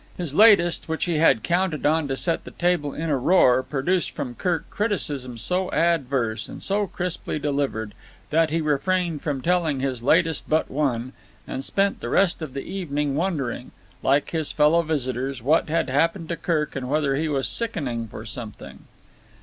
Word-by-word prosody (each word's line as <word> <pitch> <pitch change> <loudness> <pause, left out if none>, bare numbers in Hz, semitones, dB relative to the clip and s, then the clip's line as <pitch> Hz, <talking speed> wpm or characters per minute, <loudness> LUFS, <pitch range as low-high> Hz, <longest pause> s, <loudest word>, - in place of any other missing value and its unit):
His 170 -6 -4
latest, 175 -4 +5
which 160 - -1
he 170 -4 0
had 135 -8 +4
counted 175 -2 0
on 155 0 +2
to 135 -1 -2
set 165 +6 -1
the - - -9
table 175 -5 0
in 160 +2 -3
a 140 - +2
roar, 130 -4 +4
produced 150 +6 -1
from 125 - -5
Kirk 175 +5 -2
criticism 145 - -2
so 180 - -1
adverse 135 -9 0
and - - -9
so 205 +1 0
crisply 180 -4 -4
delivered 140 -7 -2 0.4
that 160 +1 +3
he 165 +2 0
refrained 160 +2 0
from 140 -4 -3
telling 170 -5 +1
his 130 -3 -2
latest 160 +4 +2
but 155 +1 +1
one 130 -3 -1 0.3
and 130 - -4
spent 195 +6 0
the - - -5
rest 185 -3 +2
of 145 -4 -6
the 135 - -3
evening 150 -7 -2
wondering, 145 -8 -2 0.3
like 140 +2 +2
his 160 -3 0
fellow 155 +3 +4
visitors, 135 -5 -2
what 155 +4 +2
had 165 +1 +1
happened 165 +5 0
to 170 - -1
Kirk 155 -3 -1
and 130 -2 -4
whether 145 -2 +1
he 155 +3 -1
was 135 -3 0
sickening 135 - -1
for 110 +1 -9
something. 115 -1 -9
150 Hz, 175 wpm, -24 LUFS, 135-170 Hz, 0.4 s, latest